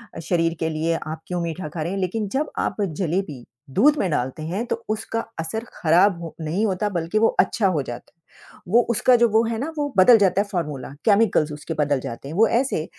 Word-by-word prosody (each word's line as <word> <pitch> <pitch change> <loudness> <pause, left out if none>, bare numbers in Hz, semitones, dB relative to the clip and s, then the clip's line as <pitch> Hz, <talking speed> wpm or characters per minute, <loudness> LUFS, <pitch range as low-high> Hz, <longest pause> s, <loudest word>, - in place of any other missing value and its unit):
अ, - - -6
शरीर 165 0 0
के 160 - 0
लिए 160 +1 -1
आप 160 +1 -6
क्यों 180 -1 -2
मीठा 170 0 -4
खा 160 +1 -6
रहे 165 +3 -2
हैं 195 - -2
लेकिन 205 +3 -2
जब 300 - -2
आप - - -3
जलेबी, 170 -6 -2 0.3
दूध 295 - +4
में 190 - 0
डालते 130 +3 -2
हैं 185 +9 -3
तो - - -3
उसका 220 +1 -2 0.2
असर 220 +8 -3
खराब 175 +2 +3
हो 165 - -8
नहीं 165 +8 -1
होता 205 +1 0
बल्कि 175 +2 -1
वो 225 - +5
अच्छा 215 -5 +3
हो 170 -6 +1
जाता 120 -1 -8
है। - - -52 0.6
वो 240 - +7
उसका 235 +2 +4
जो 235 0 +4
वो 220 +2 +3
है 225 0 -2
ना 310 +5 -3
वो 290 -1 0
बदल 225 +5 +8
जाता 195 -1 +3
है, 205 - -4
फ़ॉर्मूला, 150 -7 -3 0.2
केमिकल्स 200 -8 +3
उसके 150 +2 -6
बदल 145 -2 +1
जाते 120 +3 -7
हैं, 155 - -6
वो 225 +2 +5
ऐसे, 235 - 0
180 Hz, 225 wpm, -23 LUFS, 160-215 Hz, 0.6 s, बदल